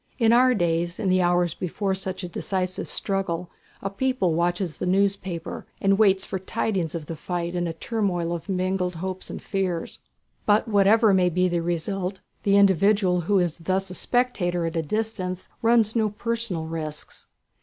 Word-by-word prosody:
In 230 -2 +4
our 250 +1 +5
days, 170 -2 0
in 200 - 0
the 185 0 +4
hours 175 -1 +2
before 190 +3 -2
such 190 0 -3
a - - -3
decisive 185 +1 -3
struggle 180 -3 -2 0.3
a 195 - -1
people 200 -5 0
watches 175 0 0
the - - -3
newspapers, 190 -3 0 0.2
and 195 +1 +2
waits 195 -3 +4
for 190 - -3
tidings 190 -4 -2
of 160 -3 -4
the 165 - -5
fight 175 +1 -3
in 175 -1 -1
a 165 - -3
turmoil 175 -3 -1
of 170 +3 -6
mingled 185 -1 0
hopes 185 +2 -5
and - - -5
fears. 185 -4 -2 0.5
But 210 +2 +4
whatever 210 +1 +5
may 180 -1 +4
be 180 +2 +2
the 175 -1 0
result 180 +3 -2 0.2
the 200 0 +3
individual, 195 -1 +4
who 200 +4 +2
is 175 -2 0
thus 190 +2 -1
a - - -5
spectator 180 -7 0
at 165 +1 -3
a 165 - +1
distance, 185 0 -3
runs 225 -1 +3
no 220 -2 +2
personal 220 -5 -2
risks. 155 -2 -5
185 Hz, 175 wpm, -25 LUFS, 175-200 Hz, 0.5 s, our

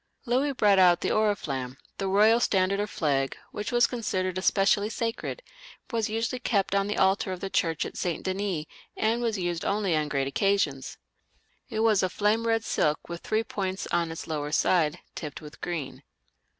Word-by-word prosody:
Louis 265 +4 +1
brought 205 -6 +4
out 180 -2 +5
the - - 0
Oriflamme, 145 -12 -1 0.2
the 195 - -1
royal 215 +4 +5
standard 195 -3 +2
or 205 - 0
flag, 140 -8 -1
which 210 +3 -4
was 240 0 +5
considered 185 -6 -2
especially 200 +2 +2
sacred, 230 - -3 0.5
was 225 -3 0
usually 225 +3 -2
kept 200 -6 0
on 200 0 +2
the 210 - -2
altar 190 0 +2
of 185 - -4
the 195 +1 -5
church 165 -3 +1
at - - -7
St. 175 -3 -2
Denis, 190 -4 -2 0.3
and 225 +2 +1
was 230 -3 0
used 175 -2 -2
only 200 -4 +1
on 150 -1 0
great 135 -2 0
occasions. 145 -5 0 0.7
It 220 -3 -2
was 220 -3 +4
of 185 -1 0
flame 215 +2 +1
red 225 -1 +2
silk, 150 -7 0
with 170 0 -6
three 220 +1 0
poiats 190 -3 -3
on 170 -1 +1
its 160 - -6
lower 150 -2 -3
^ide, 155 +1 +2 0.2
tipped 150 -3 -6
with 150 -1 -12
green. 140 -6 -4
195 Hz, 180 wpm, -27 LUFS, 165-215 Hz, 0.7 s, out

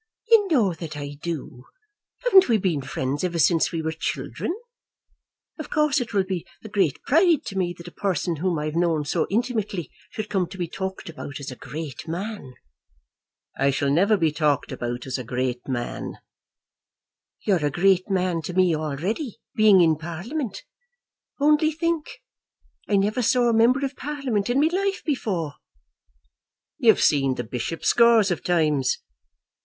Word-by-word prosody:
"You 430 -3 +6
know 225 - +3
that 160 -2 -7
I 145 0 -6
do. 145 -6 -5 0.6
Haven't 390 - +6
we 230 - +4
been 180 -8 0
friends 135 +3 -3
ever 175 -2 -1
since 165 0 +3
we 165 -1 -3
were 160 - -1
children? 165 - -3 1.1
Of 310 - -6
course 300 -3 +2
it 235 - -5
will 200 -3 +2
be 185 -3 -3 0.2
a 220 - -8
great 190 -9 +1
pride 325 +1 +3
to 195 - -6
me 175 -2 -1
that 170 - -11
a - - -8
person 180 -3 -1
whom 175 +1 0
I 150 - -2
have 155 +1 -3
known 165 -3 +1
so 160 +2 0
intimately 215 - -2 0.2
should 215 -1 -5
come 190 -4 0
to 190 - -10
be 175 -2 -2
talked 190 +3 -5
about 150 -3 -7
as 140 -2 -6
a - - -7
great 150 +4 -7
man." 175 - -5 1.0
"I 140 - +2
shall 140 +1 0
never 200 +8 +4
be 165 -4 +2
talked 145 -3 0
about 120 -1 -4
as 130 0 -3
a - - -4
great 125 +1 -3
man." 120 -3 -3 1.3
"You're 185 -7 +2
a 145 - +2
great 185 +5 +2
man 180 -3 0
to 180 - -4
me 185 -3 +4
already, 170 - -3 0.2
being 210 -4 +6
in 160 -2 +4
Parliament. 190 - -5 0.8
Only 300 +2 +4
think; 330 0 -3 0.7
I 205 - +3
never 205 +5 +1
saw 245 +1 +3
a - - +2
member 245 +5 +4
of 270 0 -5
Parliament 260 -8 -2
in 250 +3 +2
my 305 +2 +4
life 395 +1 -1
before." 185 - -2 1.2
"You've 230 -6 +5
seen 135 -3 +3
the - - -3
bishop 125 +8 -4
scores 230 -4 +5
of 175 - -2
times." 150 -7 +2
180 Hz, 170 wpm, -24 LUFS, 155-230 Hz, 1.3 s, You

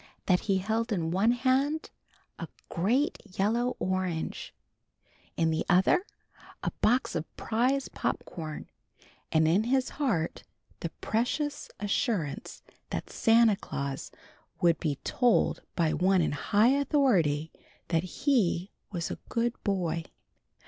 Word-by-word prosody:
That 180 -2 +4
he 195 - +4
held 220 +4 -1
in 165 -5 0
one 195 +6 +3
hand 265 +5 +1 0.5
a - - -4 0.2
great 250 - +1 0.2
yellow 235 +5 +1
orange, 185 -3 -2 0.9
in 165 -1 +2
the 160 - 0
other 195 - +4 0.6
a - - 0
box 250 +4 +2
of 160 -2 -5
prize 255 +4 +1
pop - - -2
corn, 155 -3 -7 0.6
and 160 0 +4
in 190 +7 +3
his 260 +1 +1
heart 225 - -1 0.4
the 170 - -3
precious 270 +6 -1
assurance 205 - -2 0.3
that - - -4
Santa 225 -1 +5
Claus 140 -8 -5 0.5
would 170 -1 +3
be 150 -3 -1
told 245 -2 +2
by 165 -3 +2
one 185 0 +3
in - - 0
high 205 +10 +3
authority 245 - +2 0.4
that 165 -1 +2 0.2
he 200 - +2 0.2
was 170 -4 -3
a - - -5
good 235 0 0
boy. 170 -5 -1
200 Hz, 125 wpm, -29 LUFS, 170-245 Hz, 0.9 s, Santa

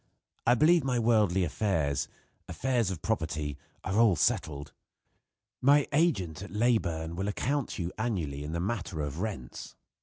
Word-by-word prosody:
I 120 - +6
believe 165 +6 +5
my 130 -2 0
worldly 105 -6 +3
affairs 80 -6 0 0.4
affairs 125 -6 0
of 90 -5 -5
property 80 -8 -1 0.3
are 95 +4 0
all 115 -5 +5
settled. 75 -2 0 0.9
My 140 +2 +5
agent 95 - +1
at 100 - -7
Leyburn 95 -8 0
will 95 +3 -2
account 140 +6 -1
to 90 - -3
you 85 - -3
annually 85 - -2
in 75 - -5
the 85 - -1
matter 95 -4 -2
of 75 +2 -4
rents. 95 - -5
95 Hz, 150 wpm, -29 LUFS, 80-120 Hz, 0.9 s, I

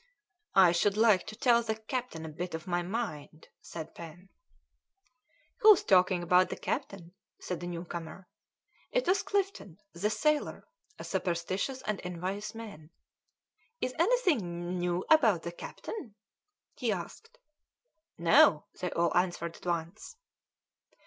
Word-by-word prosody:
"I 185 -3 +7
should 195 +4 +1
like 215 -4 +4
to 215 - -7
tell 235 +1 +4
the 220 -1 -2
captain 220 -6 -5
a - - -6
bit 170 +2 -5
of 160 0 -7
my 175 -1 0
mind," 175 -6 -5
said 160 -2 -8
Pen. 170 +3 -11 1.3
"Who's 425 -3 +7
talking 185 -1 +3
about 180 +2 +4
the - - -3
captain?" 175 -3 -4 0.3
said 180 -2 -5
a 175 - -5
new 175 0 -5
comer. 170 +2 -8 0.6
It - - +1
was 370 +2 +3
Clifton, 390 - -2 0.2
the 185 +5 -1
sailor, 295 +8 0 0.3
a - - -8
superstitious 190 +8 -2
and 210 -2 -2
envious 185 +5 -4
man. 200 -9 -9 0.9
"Is 255 - -2
anything 205 - +1
new 175 0 0
known 175 +1 -1
about 225 - +5
the 170 - -4
captain?" 235 - -8 0.6
he - - -1
asked. 465 +2 -7 0.8
"No," 165 -2 +5
they 180 - -2
all 170 0 +1
answered 175 -2 0
at - - -11
once. 170 - -4
185 Hz, 135 wpm, -30 LUFS, 170-225 Hz, 1.3 s, I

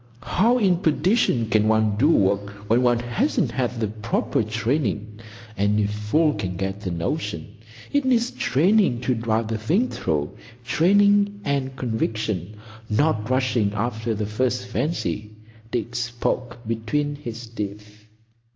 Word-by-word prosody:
"How 205 - +3
in 190 -7 +3
perdition 160 - +2
can 110 -1 +2
one 110 -1 +3
do 135 +9 +3
work 100 -6 +2 0.2
when 115 +3 +3
one 120 -1 +3
hasn't 120 - 0
had 125 -1 -2
the 110 - +1
proper 110 +3 -1
training? 110 -1 -2 0.4
Any 105 +1 +2
fool 105 +10 +1
can 90 -7 -4
get 95 +1 -3
a - - 0
notion. 90 - -3 0.4
It 285 0 +3
needs 245 -2 +2
training 170 - +2
to 125 0 +1
drive 115 -1 0
the 110 -1 -2
thing 185 - +1
through,—training 160 - +1
and 135 -2 -1
conviction; 110 -5 -2 0.3
not 110 -1 +1
rushing 125 -5 +1
after 110 +1 -2
the 105 0 -2
first 125 +4 -1
fancy." 120 -5 -3 0.3
Dick 120 0 -3
spoke 120 0 -2
between 115 +6 -1
his 120 -4 -7
teeth. 105 -1 -7
115 Hz, 135 wpm, -23 LUFS, 105-145 Hz, 0.4 s, How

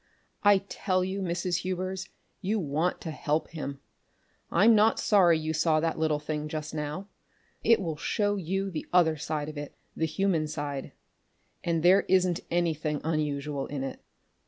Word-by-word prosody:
I 205 -1 +6
tell 185 -3 0
you, 190 +2 -3
Mrs. 175 -1 -1
Hubers, 185 +1 -3 0.3
you 210 +3 0
want 160 +2 0
to 160 - -4
help 150 +1 -1
him! 140 -4 -6 0.7
I'm 215 +7 +5
not 220 +1 +4
sorry 180 -6 +5
you 155 0 -2
saw 155 0 +3
that 165 0 -1
little 155 -1 +2
thing 150 0 -3
just 155 0 -5
now. 150 +5 -4 0.6
It 230 - +5
will 165 -6 -3
show 205 +5 0
you 195 +1 -2
the 155 - -5
other 170 -3 +4
side 150 -1 -3
of 155 -1 -6
it 145 - -7 0.2
the 160 - 0
human 160 -1 +1
side. 145 -3 -4 0.7
And 165 -1 0
there 185 +3 +6
wasn't 185 -2 +3
anything 160 -3 0
unusual 150 -3 -1
in 140 -2 -4
it. 135 - -6
165 Hz, 160 wpm, -28 LUFS, 150-185 Hz, 0.7 s, I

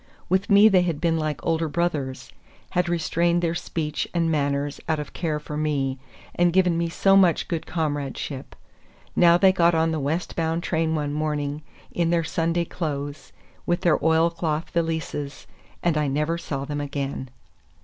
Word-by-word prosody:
With 190 +2 +1
me 205 +1 +8
they 190 -4 +5
had 170 -4 -1
been 165 -2 +1
like 155 -1 -3
older 165 0 +1
brothers; 145 -5 -2 0.4
had 180 0 +1
restrained 170 0 +1
their 165 -1 +1
speech 160 -3 -3
and 165 -1 +2
manners 145 -1 -1
out 160 - +2
of 150 - -6
care 155 -3 -2
for 150 0 -7
me, 140 -3 -1 0.3
and 175 0 +3
given 180 -1 +3
me 170 0 0
so 195 +3 +3
much 180 -5 +4
good 165 -2 -3
comradeship. 145 -3 -3 0.6
Now 170 -1 +6
they 190 +1 +6
got 170 -2 +3
on 160 0 +2
the 160 - -1
west 150 +5 -2
bound 165 +1 -1
train 160 -2 0
one 145 -2 -2
morning, 150 -1 -2 0.3
in 170 -1 0
their 170 -1 +2
Sunday 165 +1 0
clothes, 145 -4 -5 0.4
with 175 - +1
their 175 -4 +2
oilcloth 160 0 +1
valises—and 160 0 -3
I 150 - +1
never 150 +4 0
saw 140 -5 -4
them 145 0 -3
again. 140 -2 -4
160 Hz, 165 wpm, -24 LUFS, 150-170 Hz, 0.6 s, me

